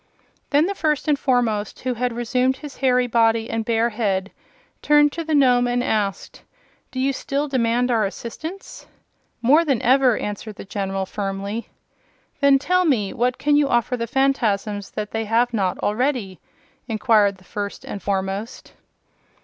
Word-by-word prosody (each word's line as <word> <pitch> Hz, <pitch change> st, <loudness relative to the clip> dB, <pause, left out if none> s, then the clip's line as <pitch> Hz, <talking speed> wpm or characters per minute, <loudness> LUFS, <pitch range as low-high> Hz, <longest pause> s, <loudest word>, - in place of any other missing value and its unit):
Then 295 Hz, +2 st, +3 dB
the 395 Hz, -, -1 dB
First 305 Hz, -5 st, -1 dB
and 290 Hz, -2 st, +2 dB
Foremost, 230 Hz, -6 st, 0 dB
who 255 Hz, 0 st, -1 dB
had 245 Hz, +1 st, -1 dB
resumed 250 Hz, +2 st, 0 dB
his 290 Hz, -1 st, -10 dB
hairy 250 Hz, -1 st, +2 dB
body 225 Hz, -1 st, +2 dB
and 225 Hz, 0 st, -1 dB
bear 230 Hz, +1 st, +1 dB
head, 200 Hz, -4 st, -1 dB, 0.5 s
turned 295 Hz, -1 st, +4 dB
to 330 Hz, -, -4 dB
the 315 Hz, -1 st, 0 dB
Nome 250 Hz, -3 st, +4 dB
and 245 Hz, 0 st, 0 dB
asked: 205 Hz, -5 st, -2 dB, 0.5 s
"Do 260 Hz, -, -6 dB
you 270 Hz, +1 st, +1 dB
still 280 Hz, +2 st, -2 dB
demand 245 Hz, -2 st, +1 dB
our 225 Hz, -2 st, +2 dB
assistance?" 305 Hz, -, -7 dB, 0.6 s
"More 295 Hz, +8 st, +5 dB
than 275 Hz, -7 st, +1 dB
ever," 255 Hz, -2 st, +4 dB
answered 210 Hz, +1 st, -5 dB
the -, -, -9 dB
General, 195 Hz, -1 st, -3 dB
firmly. 200 Hz, +3 st, -4 dB, 0.7 s
"Then 280 Hz, -1 st, +5 dB
tell 365 Hz, +6 st, +1 dB
me: 235 Hz, -, +1 dB
what 245 Hz, +1 st, 0 dB
can 295 Hz, 0 st, +2 dB
you 290 Hz, -1 st, +3 dB
offer 240 Hz, +1 st, +1 dB
the 235 Hz, -1 st, -3 dB
Phanfasms 225 Hz, -6 st, 0 dB
that 210 Hz, -1 st, -4 dB
they 225 Hz, 0 st, -2 dB
have 235 Hz, +3 st, +1 dB
not 190 Hz, -5 st, 0 dB
already?" 220 Hz, -3 st, -1 dB, 0.5 s
inquired 215 Hz, -3 st, +2 dB
the 185 Hz, -, -21 dB
First 200 Hz, +1 st, -6 dB
and 200 Hz, -, -6 dB
Foremost. 195 Hz, +2 st, -3 dB
235 Hz, 160 wpm, -22 LUFS, 210-270 Hz, 0.7 s, More